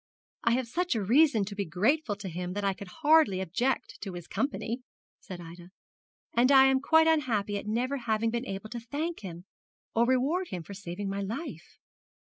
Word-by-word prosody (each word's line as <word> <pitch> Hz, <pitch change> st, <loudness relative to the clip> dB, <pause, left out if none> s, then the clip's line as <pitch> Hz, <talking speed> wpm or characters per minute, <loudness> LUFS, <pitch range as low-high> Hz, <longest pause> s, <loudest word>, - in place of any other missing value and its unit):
'I 235 Hz, -, +4 dB
have 255 Hz, 0 st, 0 dB
such 350 Hz, +3 st, -1 dB
a 215 Hz, -, 0 dB
reason 245 Hz, 0 st, +4 dB
to 200 Hz, -, -6 dB
be 200 Hz, 0 st, -2 dB
grateful 210 Hz, -, +1 dB
to 200 Hz, -1 st, -7 dB
him 180 Hz, +1 st, -4 dB
that 205 Hz, +1 st, -3 dB
I 195 Hz, -1 st, +2 dB
could 195 Hz, +1 st, -10 dB
hardly 305 Hz, -, +4 dB
object 240 Hz, +9 st, -1 dB
to 195 Hz, -3 st, -5 dB
his 175 Hz, -2 st, -7 dB
company,' 255 Hz, -3 st, -2 dB, 0.4 s
said 185 Hz, -2 st, -9 dB
Ida; 170 Hz, +1 st, -11 dB, 0.6 s
'and 250 Hz, +3 st, +4 dB
I 270 Hz, -1 st, +8 dB
am 265 Hz, 0 st, +4 dB
quite 320 Hz, +3 st, +5 dB
unhappy 240 Hz, -11 st, +1 dB
at 205 Hz, -, -9 dB
never 250 Hz, +6 st, 0 dB
having 225 Hz, -2 st, 0 dB
been 240 Hz, +2 st, -3 dB
able 195 Hz, +3 st, -6 dB
to 240 Hz, -, -4 dB
thank 295 Hz, +8 st, -4 dB
him 175 Hz, -2 st, -8 dB, 0.5 s
or 235 Hz, +1 st, +3 dB
reward 280 Hz, +9 st, +1 dB
him 180 Hz, -, -5 dB
for 200 Hz, -, -9 dB
saving 195 Hz, 0 st, -5 dB
my 195 Hz, +1 st, -2 dB
life.' 225 Hz, -, -6 dB
225 Hz, 195 wpm, -29 LUFS, 195-270 Hz, 0.6 s, I